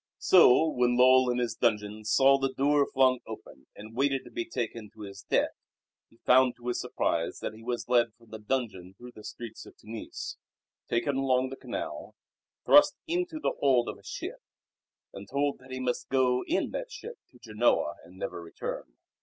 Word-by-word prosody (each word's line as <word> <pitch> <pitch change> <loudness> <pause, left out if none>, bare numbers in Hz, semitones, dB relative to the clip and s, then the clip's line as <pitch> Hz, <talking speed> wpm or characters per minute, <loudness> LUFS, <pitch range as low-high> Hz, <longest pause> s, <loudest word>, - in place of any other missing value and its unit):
So 160 -3 +6
when 125 -4 +1
Lull 130 0 +6
in 125 - 0
his 120 -3 -1
dungeon 105 -2 -1
saw 135 +5 +5
the 135 0 0
door 140 +2 +2
flung 130 -2 +3
open - - -11
and 110 +2 -11
waited 135 +1 +1
to - - -14
be 350 +1 -3
taken 115 - -4
to 110 - -12
his 100 -1 -9
death - - +1 0.6
he 115 - -25
found 125 -1 +5
to 120 0 -6
his 120 - -1
surprise - - -1
that - - -3
he 110 - -13
was 120 0 -4
led 120 -2 +2
from 115 -2 -22
the 110 - -7
dungeon 105 -6 -3
through 125 0 -11
the 110 - -14
streets 115 0 -8
of - - -16
Tunis, 110 +1 -7 0.5
taken 130 +4 0
along 130 -1 +1
the 135 - -7
canal, - - -6 0.5
thrust 295 0 +7
into 345 -1 -2
the - - 0
hold 130 -4 +3
of - - -6
a - - -22
ship, - - -6 0.7
and 100 0 -10
told 140 0 0
that 130 +1 -17
he 130 0 -5
must 125 -1 -2
go 125 -1 +2
in 345 - 0
that - - -5
ship 480 -2 -9
to - - -20
Genoa 115 0 +1
and 90 +2 -16
never 95 -2 -5
return. 80 -6 -7
125 Hz, 190 wpm, -29 LUFS, 110-135 Hz, 0.7 s, thrust